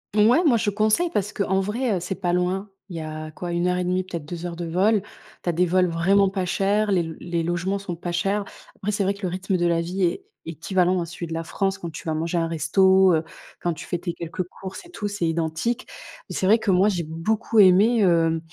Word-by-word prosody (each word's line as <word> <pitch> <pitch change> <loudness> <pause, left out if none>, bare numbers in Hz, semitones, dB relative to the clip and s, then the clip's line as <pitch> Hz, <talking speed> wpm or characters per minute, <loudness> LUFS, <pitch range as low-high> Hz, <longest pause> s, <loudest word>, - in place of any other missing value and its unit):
Mouais, 230 +11 +5
moi, 255 -7 +5
je 220 -1 0
conseille 215 - +2
parce 205 -1 -1
qu'en 190 -1 0
vrai, 215 +3 -1
heu, - - -2
c'est 180 +2 -4
pas 175 -2 0
loin. 185 +3 0 0.2
Il 175 - -7
y 165 - -4
a, 155 0 -6
quoi, 175 +3 -6
1 180 +1 +1
et 180 - 0
1/2 180 +1 0
peut-être 170 -5 -6
2 170 +2 -6
heures 175 -1 -4
de 170 0 -5
vol. 195 +6 +2 0.4
Tu - - -1
as - - +3
des 175 +2 +2
vols 180 +1 +3
vraiment 190 +4 +3
pas 190 -1 -2
chers, 205 +3 +1
les 185 -3 +3
l 165 -1 -6
les 170 -1 -2
logements 175 +3 -1
sont 190 -3 -5
pas 175 +1 -4
chers. 195 +4 0 0.3
Après 210 - -2
c'est 200 - 0
vrai 195 +1 +1
que 200 +1 -15
le - - +1
rythme 185 +2 -1
de 175 - 0
la 170 -1 +2
vie 185 +3 -2
est 180 - 0 0.2
équivalent 180 +3 0
à - - -2
celui 170 +1 -7
de 165 - -6
la 165 0 -2
France 195 +3 -1
quand 175 -3 -6
tu 155 - -9
vas 160 - 0
manger 165 +2 -1
un 165 - +1
resto, 190 +3 +4
heu, 160 0 +1 0.4
quand 175 - 0
tu 155 - -9
fais 175 - -2
tes 175 0 -4
quelques 170 +2 -4
courses 190 - -9
et - - -15
tout, 210 -10 -4
c'est 200 -4 -1
identique 165 +9 -1 0.4
mais - - -6
c'est - - 0
vrai 210 +4 +6
que 220 -3 0
moi 185 +3 +4
j'ai 180 -5 0
beaucoup 205 +8 0
aimé, 205 +5 +6
hem, 165 -4 +3
180 Hz, 255 wpm, -24 LUFS, 170-200 Hz, 0.4 s, vrai